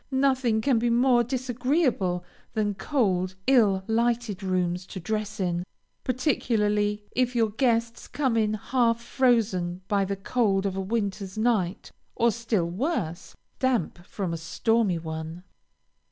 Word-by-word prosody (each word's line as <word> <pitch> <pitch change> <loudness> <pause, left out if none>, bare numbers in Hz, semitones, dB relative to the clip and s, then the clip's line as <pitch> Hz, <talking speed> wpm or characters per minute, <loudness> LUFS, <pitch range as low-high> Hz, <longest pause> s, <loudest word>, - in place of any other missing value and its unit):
Nothing 260 -4 +2
can 245 0 +2
be 240 +1 +1
more 240 +1 +4
disagreeable 250 - 0 0.3
than 210 -1 +1
cold, 190 -5 0
ill 215 -8 +4
lighted 230 -2 0
rooms 180 -1 -1
to 190 - -7
dress 215 +3 -3
in, 175 -2 0 0.4
particularly 210 -6 0
if 250 0 0
your 225 -2 +2
guests 230 0 0
come 265 -5 0
in 215 -1 +2
half 235 +1 +1
frozen 220 -8 +1
by 200 -1 +2
the 200 +1 -2
cold 195 -1 0
of 195 -1 -1
a 195 - -2
winter's 200 -1 -3
night, 215 -5 0 0.2
or 235 -1 +3
still 220 -6 -1
worse, 185 - -3 0.2
damp 240 -10 0
from 180 -1 -4
a - - -2
stormy 210 +3 +1
one. 160 +1 -6
220 Hz, 135 wpm, -26 LUFS, 190-240 Hz, 0.4 s, more